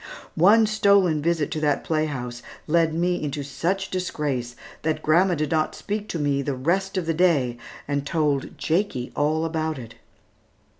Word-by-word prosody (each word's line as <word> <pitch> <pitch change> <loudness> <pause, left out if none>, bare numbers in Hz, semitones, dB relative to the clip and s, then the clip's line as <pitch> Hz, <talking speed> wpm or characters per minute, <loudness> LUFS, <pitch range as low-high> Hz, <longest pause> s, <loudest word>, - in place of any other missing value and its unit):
One 210 +7 +5
stolen 200 -7 +3
visit 165 -2 0
to 155 - -2
that 145 -2 +1
playhouse 135 -6 -2 0.2
led 165 0 +2
me 175 +1 0
into 145 0 -3
such 170 +8 -2
disgrace, 145 -9 -2 0.3
that 160 0 -1
grandma 175 +4 +4
did 150 -1 -2
not 155 -1 +1
speak 210 +1 -4
to - - -2
me 145 -2 0
the 140 0 -2
rest 190 +9 0
of 180 - -1
the 165 - 0
day, 145 -9 +2 0.3
and 145 -1 -1
told 145 -2 -1
Jakie 155 -3 -1
all 155 +2 +1
about 160 -1 -2
it. 115 -2 -9
155 Hz, 160 wpm, -24 LUFS, 140-180 Hz, 0.3 s, One